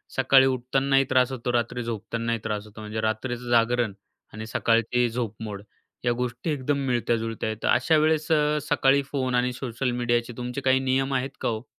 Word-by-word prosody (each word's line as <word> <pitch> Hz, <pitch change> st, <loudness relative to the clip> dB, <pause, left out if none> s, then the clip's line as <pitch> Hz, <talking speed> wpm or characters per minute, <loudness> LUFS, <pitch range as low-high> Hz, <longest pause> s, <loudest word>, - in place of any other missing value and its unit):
सकाळी 130 Hz, 0 st, +5 dB
उठतानाही 135 Hz, +2 st, +2 dB
त्रास 130 Hz, 0 st, +3 dB
होतो, 125 Hz, -1 st, -3 dB
रात्री 120 Hz, +1 st, -1 dB
झोपतानाही 115 Hz, +1 st, -3 dB
त्रास 105 Hz, -1 st, -3 dB
होतो 105 Hz, +1 st, -12 dB
म्हणजे 110 Hz, +1 st, -4 dB
रात्रीचं 120 Hz, +3 st, -2 dB
जागरण 120 Hz, -2 st, +2 dB, 0.4 s
आणि 110 Hz, +1 st, -6 dB
सकाळची 115 Hz, +2 st, +2 dB
झोपमोड 110 Hz, -3 st, -5 dB, 0.4 s
या 120 Hz, -, +3 dB
गोष्टी 125 Hz, +5 st, -3 dB
एकदम 140 Hz, 0 st, -1 dB
मिळत्या-जुळत्या 115 Hz, -2 st, -1 dB
आहेत. 110 Hz, -, -4 dB
तर -, -, +1 dB
अशा 145 Hz, +6 st, +3 dB
वेळेस 155 Hz, 0 st, +1 dB
अ, 150 Hz, -1 st, +3 dB
सकाळी 135 Hz, +1 st, +4 dB
फोन 130 Hz, -3 st, -1 dB
आणि 125 Hz, 0 st, +1 dB
सोशल 125 Hz, 0 st, -3 dB
मीडियाचे 120 Hz, 0 st, 0 dB
तुमचे 125 Hz, +2 st, -4 dB
काही 130 Hz, 0 st, +3 dB
नियम 135 Hz, +1 st, 0 dB
आहेत 130 Hz, +1 st, -2 dB
का -, -, 0 dB
हो? 110 Hz, +1 st, -4 dB
125 Hz, 175 wpm, -25 LUFS, 115-135 Hz, 0.4 s, सकाळी